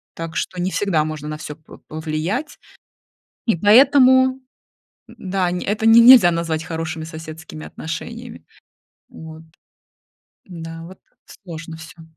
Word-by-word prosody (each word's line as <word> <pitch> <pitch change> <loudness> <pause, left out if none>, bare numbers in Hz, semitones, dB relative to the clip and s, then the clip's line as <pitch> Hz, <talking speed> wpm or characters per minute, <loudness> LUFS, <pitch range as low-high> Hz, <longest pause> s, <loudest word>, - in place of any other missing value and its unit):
Так 165 0 -7
что 180 -1 -3
не 180 - -1
всегда 185 -7 0
можно 155 -1 -6
на 155 0 -5
всё 150 -1 -8
по 155 0 -16
повлиять. 160 - -4 0.9
И 225 - +2
поэтому, 260 - +5 0.8
м, - - -15
да, 185 -1 -2
не 180 - -3
это 210 +2 -2
не 225 +1 +7
нельзя 235 -7 +8
назвать 165 -1 -2
хорошими 160 0 -5
соседскими 160 -1 -10
отношениями, 230 +8 -8 0.6
вот. 160 0 -12 1.1
М-да, 165 -2 -9
вот, 185 +2 -13 0.3
сложно 165 -3 -10
всё. 165 +1 -13
165 Hz, 130 wpm, -20 LUFS, 160-205 Hz, 1.1 s, нельзя